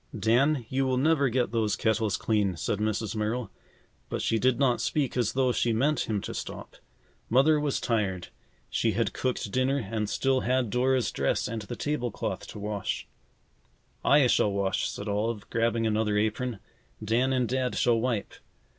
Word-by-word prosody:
"Dan, 120 Hz, +6 st, +2 dB
you 135 Hz, +2 st, 0 dB
will 130 Hz, -1 st, +1 dB
never 140 Hz, 0 st, +3 dB
get 125 Hz, 0 st, 0 dB
those 110 Hz, -3 st, +1 dB
kettles 110 Hz, -2 st, +1 dB
clean," 105 Hz, -5 st, 0 dB
said 100 Hz, -, -2 dB
Mrs. 110 Hz, 0 st, -1 dB
Merrill, 110 Hz, +1 st, -2 dB, 0.6 s
but -, -, -2 dB
she 115 Hz, -, +1 dB
did 125 Hz, 0 st, +2 dB
not 130 Hz, -3 st, +2 dB
speak 140 Hz, -5 st, 0 dB
as 120 Hz, -4 st, +1 dB
though 130 Hz, -1 st, +2 dB
she 120 Hz, -1 st, +1 dB
meant 140 Hz, +5 st, +1 dB
him 105 Hz, -3 st, 0 dB
to -, -, -6 dB
stop. -, -, -7 dB, 0.5 s
Mother 140 Hz, +6 st, +4 dB
was 145 Hz, -2 st, 0 dB
tired. 100 Hz, -7 st, -1 dB, 0.4 s
She -, -, 0 dB
had -, -, 0 dB
cooked 125 Hz, -5 st, -2 dB
dinner 130 Hz, +3 st, +1 dB
and 110 Hz, -3 st, -3 dB
still 135 Hz, +2 st, +1 dB
had 125 Hz, -3 st, 0 dB
Dora's 130 Hz, 0 st, +1 dB
dress -, -, 0 dB
and 115 Hz, -1 st, -4 dB
the 115 Hz, +4 st, -6 dB
table 145 Hz, -2 st, -2 dB
cloth 100 Hz, -2 st, -4 dB
to -, -, -9 dB
wash. 105 Hz, -1 st, -3 dB, 1.0 s
"I 145 Hz, -1 st, +5 dB
shall 105 Hz, -4 st, +3 dB
wash," 100 Hz, -1 st, 0 dB
said 100 Hz, -, -6 dB
Olive, 105 Hz, +1 st, -2 dB
grabbing 115 Hz, 0 st, +1 dB
another 105 Hz, -1 st, +1 dB
apron. 110 Hz, +3 st, -1 dB, 0.5 s
"Dan 120 Hz, +5 st, +1 dB
and 125 Hz, -2 st, +1 dB
Dad 130 Hz, +1 st, -1 dB
shall 120 Hz, -2 st, +3 dB
wipe. 120 Hz, -4 st, -1 dB
115 Hz, 175 wpm, -28 LUFS, 105-130 Hz, 1.0 s, I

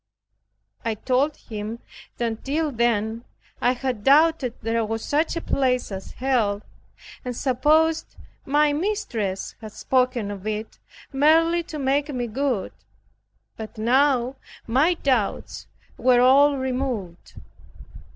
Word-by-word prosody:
I 225 Hz, -1 st, -1 dB
told 265 Hz, +7 st, 0 dB
him 215 Hz, +1 st, -6 dB, 0.4 s
that 230 Hz, -2 st, -3 dB
till 300 Hz, +2 st, -1 dB
then 230 Hz, -2 st, 0 dB, 0.4 s
I 245 Hz, -, +3 dB
had 250 Hz, -4 st, -3 dB
doubted 290 Hz, -2 st, +4 dB
there 225 Hz, +1 st, 0 dB
was 225 Hz, +1 st, -3 dB
such 310 Hz, +4 st, 0 dB
a 335 Hz, -, -2 dB
place 250 Hz, -6 st, 0 dB
as 190 Hz, 0 st, -7 dB
Hell, 225 Hz, -6 st, 0 dB, 0.6 s
and 250 Hz, -2 st, -4 dB
supposed 310 Hz, +5 st, +2 dB, 0.3 s
my 295 Hz, +1 st, +2 dB
mistress 245 Hz, -, -2 dB
had 215 Hz, -1 st, -9 dB
spoken 250 Hz, -5 st, 0 dB
of 200 Hz, 0 st, -7 dB
it 215 Hz, +1 st, -4 dB, 0.3 s
merely 325 Hz, +5 st, +4 dB
to 310 Hz, -, -7 dB
make 280 Hz, +1 st, 0 dB
me 250 Hz, -3 st, -2 dB
good, 245 Hz, -2 st, -2 dB, 0.8 s
but 220 Hz, -1 st, -8 dB
now 255 Hz, +2 st, +2 dB, 0.3 s
my 280 Hz, +10 st, +3 dB
doubts 255 Hz, -10 st, -1 dB, 0.3 s
were 250 Hz, -1 st, +4 dB
all 280 Hz, +3 st, +5 dB
removed. 250 Hz, -9 st, -4 dB
255 Hz, 120 wpm, -24 LUFS, 225-285 Hz, 0.8 s, all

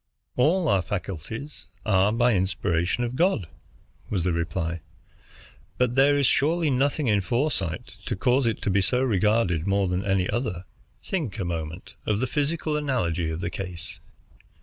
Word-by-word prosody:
"All 160 Hz, +7 st, +3 dB
our 100 Hz, -8 st, +3 dB
faculties 105 Hz, -, -6 dB, 0.2 s
are 100 Hz, -1 st, +3 dB
by 120 Hz, +2 st, +3 dB
inspiration 90 Hz, +2 st, 0 dB
of 120 Hz, +1 st, -3 dB
God," 170 Hz, -, +2 dB, 0.6 s
was 95 Hz, -5 st, 0 dB
the 90 Hz, -1 st, +1 dB
reply, 85 Hz, 0 st, -2 dB, 1.0 s
"but 125 Hz, -1 st, +2 dB
there 140 Hz, +2 st, +5 dB
is 140 Hz, -, +3 dB
surely 155 Hz, +4 st, +2 dB
nothing 140 Hz, +3 st, +1 dB
in 105 Hz, -4 st, +3 dB
foresight 120 Hz, -, -1 dB
to -, -, 0 dB
cause 125 Hz, +5 st, +2 dB
it 115 Hz, -, -1 dB
to 100 Hz, -, +1 dB
be 100 Hz, +1 st, +3 dB
so 125 Hz, +6 st, +1 dB
regarded 105 Hz, -6 st, +2 dB
more 100 Hz, 0 st, +2 dB
than 90 Hz, +1 st, -1 dB
any 95 Hz, -2 st, +1 dB
other. 110 Hz, -8 st, -2 dB, 0.4 s
Think 155 Hz, -, -2 dB
a 95 Hz, -, -2 dB
moment 85 Hz, 0 st, -5 dB
of 105 Hz, -1 st, +1 dB
the 130 Hz, -, +1 dB
physical 150 Hz, +3 st, -1 dB
analogy 90 Hz, -, 0 dB
of 80 Hz, +2 st, -4 dB
the 85 Hz, -, -2 dB
case. 90 Hz, -2 st, -6 dB
105 Hz, 160 wpm, -25 LUFS, 90-130 Hz, 1.0 s, there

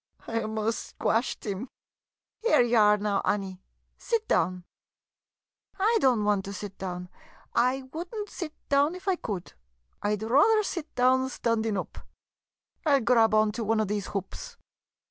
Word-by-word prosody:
] -, -, -26 dB
I 230 Hz, 0 st, -1 dB
'most 220 Hz, 0 st, -1 dB
squashed 230 Hz, +3 st, -1 dB
'im. 210 Hz, +4 st, -4 dB, 0.7 s
Here 465 Hz, -, +4 dB
ye 240 Hz, 0 st, -1 dB
are 210 Hz, -2 st, +6 dB
now, 205 Hz, -1 st, 0 dB
Annie 190 Hz, -2 st, -2 dB, 0.2 s
— -, -, -47 dB
sit 455 Hz, -2 st, +1 dB
down. 180 Hz, 0 st, +1 dB, 1.1 s
I 440 Hz, +4 st, +3 dB
don't 245 Hz, -5 st, +3 dB
want 205 Hz, -2 st, +2 dB
to 200 Hz, -, -6 dB
sit 200 Hz, 0 st, -7 dB
down 180 Hz, -1 st, -5 dB, 0.3 s
— -, -, -28 dB, 0.2 s
I 265 Hz, +1 st, -5 dB
would 335 Hz, +3 st, -4 dB
n't 425 Hz, -2 st, -4 dB
sit 335 Hz, -6 st, -7 dB
down 285 Hz, +4 st, +3 dB
if 365 Hz, +2 st, -11 dB
I 380 Hz, -, +3 dB
could 195 Hz, -, -5 dB, 0.2 s
— -, -, -44 dB
I 210 Hz, +1 st, +1 dB
'd 210 Hz, -, -7 dB
rather 305 Hz, -, +4 dB
sit 340 Hz, -6 st, -5 dB
down 260 Hz, +1 st, +3 dB
standin' 225 Hz, -4 st, 0 dB
oop! 185 Hz, -, -5 dB, 0.8 s
I 305 Hz, -3 st, +3 dB
'11 275 Hz, -3 st, +3 dB
grab 225 Hz, -3 st, +4 dB
onto 215 Hz, +2 st, +2 dB
one 220 Hz, +1 st, +1 dB
of 215 Hz, -2 st, 0 dB
these 205 Hz, -2 st, -2 dB
hoops 205 Hz, -, -6 dB
225 Hz, 175 wpm, -27 LUFS, 205-285 Hz, 1.1 s, are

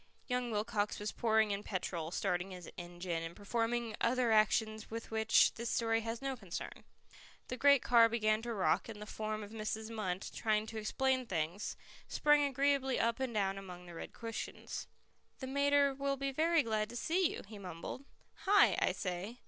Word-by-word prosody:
Young 250 Hz, -1 st, -1 dB
Wilcox 210 Hz, -1 st, -1 dB
was 210 Hz, 0 st, -3 dB
pouring 220 Hz, -2 st, +2 dB
in 200 Hz, 0 st, -1 dB
petrol, 175 Hz, -5 st, -3 dB
starting 180 Hz, 0 st, -1 dB
his 180 Hz, -3 st, -9 dB
engine, 175 Hz, -1 st, -4 dB
and 165 Hz, +1 st, -6 dB
performing 230 Hz, +2 st, -1 dB
other 245 Hz, 0 st, +2 dB
actions 215 Hz, 0 st, +2 dB
with 225 Hz, 0 st, -6 dB
which 220 Hz, 0 st, +4 dB
this 235 Hz, 0 st, -4 dB
story 225 Hz, -1 st, +1 dB
has 230 Hz, +3 st, -4 dB
no 270 Hz, -1 st, -1 dB
concern. 195 Hz, -8 st, -7 dB, 0.6 s
The 255 Hz, -, -3 dB
great 280 Hz, -1 st, +5 dB
car 230 Hz, -2 st, +6 dB
began 215 Hz, -1 st, +2 dB
to 235 Hz, 0 st, -3 dB
rock, 200 Hz, -, +1 dB
and 215 Hz, -2 st, -7 dB
the 210 Hz, -, -7 dB
form 215 Hz, 0 st, -4 dB
of 205 Hz, -, -10 dB
Mrs. 220 Hz, 0 st, -4 dB
Munt, 190 Hz, -4 st, -3 dB
trying 215 Hz, -1 st, +1 dB
to 220 Hz, -, -7 dB
explain 260 Hz, +3 st, 0 dB
things, 175 Hz, +1 st, -2 dB, 0.3 s
sprang 295 Hz, -1 st, +4 dB
agreeably 275 Hz, -1 st, +1 dB
up 230 Hz, +1 st, +1 dB
and 260 Hz, -2 st, -1 dB
down 195 Hz, -3 st, 0 dB
among 180 Hz, -2 st, -9 dB
the 175 Hz, -, -10 dB
red 165 Hz, -, -7 dB
cushions. 230 Hz, -1 st, -6 dB, 0.5 s
"The 260 Hz, -, -6 dB
mater 280 Hz, +1 st, +3 dB
will 275 Hz, 0 st, -1 dB
be 275 Hz, 0 st, -1 dB
very 320 Hz, +3 st, +3 dB
glad 215 Hz, -1 st, -1 dB
to 240 Hz, -, -8 dB
see 340 Hz, +7 st, +2 dB
you," -, -, -6 dB
he 210 Hz, -1 st, -9 dB
mumbled. 180 Hz, +7 st, -7 dB, 0.4 s
"Hi! 405 Hz, +1 st, +6 dB
I -, -, +3 dB
say. 190 Hz, +5 st, -4 dB
220 Hz, 180 wpm, -34 LUFS, 200-250 Hz, 0.6 s, car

